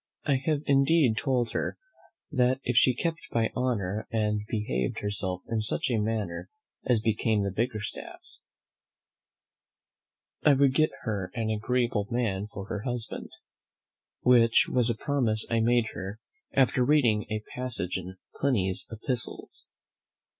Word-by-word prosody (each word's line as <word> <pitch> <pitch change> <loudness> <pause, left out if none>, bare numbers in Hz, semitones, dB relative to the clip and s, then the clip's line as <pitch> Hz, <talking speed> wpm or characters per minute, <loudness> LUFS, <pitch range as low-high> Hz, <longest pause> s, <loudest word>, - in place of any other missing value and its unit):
I 140 -3 +3
have 150 -2 +1
indeed 140 -2 +4
told 125 -1 0
her - - -2 0.5
that 130 -2 +2
if 125 - -1
she 125 +2 +5
kept 165 +4 -1
her 115 -1 +1
honour, 110 -6 -1
and 105 -2 0
behaved 65 - -2
herself 95 -3 -2
in 115 -1 -1
such 110 +3 +1
a 115 - +2
manner 105 -5 -2 0.4
as 125 -3 +4
became 110 -1 +1
the 100 - -1
Bickerstaffs, 110 +1 -4 2.0
I 150 - +6
would 135 -1 +4
get 155 +3 +3
her 100 -5 -2
an 110 -2 -1
agreeable 115 -1 0
man 110 -5 -1
for 100 -2 -8
her 105 0 -4
husband; 120 -1 -4 0.9
which 115 -2 +5
was 125 -2 +3
a 115 - +1
promise 120 -7 0
I 115 - +3
made 120 0 +2
her 95 +3 -6 0.3
after 130 -1 +3
reading 120 -7 +3
a 110 0 -3
passage 120 -8 -2
in 95 +1 -9 0.2
Pliny's 100 -9 0
"Epistles." 115 +1 -4
115 Hz, 135 wpm, -28 LUFS, 105-125 Hz, 2.0 s, I